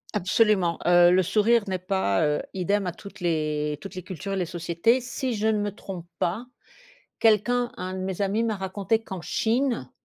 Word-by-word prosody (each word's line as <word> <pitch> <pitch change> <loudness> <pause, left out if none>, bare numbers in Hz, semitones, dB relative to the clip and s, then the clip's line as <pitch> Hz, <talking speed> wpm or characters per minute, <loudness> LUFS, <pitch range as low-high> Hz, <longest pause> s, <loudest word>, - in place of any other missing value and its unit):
Absolument, 190 -3 +2
heu, 175 0 +6
le 185 0 +4
sourire 215 +4 +3
n'est 185 -1 -2
pas, 185 - 0
heu, 150 0 +1
idem 195 +2 0
à 180 - -1
toutes 200 +4 -12
les 150 -3 -1
toutes 195 - -9
les 185 - -6
cultures 190 +2 -6
et - - 0
les 185 -2 0
sociétés. 170 +9 +1
Si 255 +1 -3
je 215 0 0
ne 220 -1 +2
me 205 0 -1
trompe 185 -4 -8
pas, 195 +8 -1 0.7
quelqu'un, 240 +3 +3
un 185 0 -5
de 190 - -5
mes 190 +1 -3
amis, 205 +4 +1
m'a 220 -2 0
raconté 195 +4 -1
qu'en 190 -4 -7
Chine 230 - 0
190 Hz, 190 wpm, -25 LUFS, 175-220 Hz, 0.7 s, heu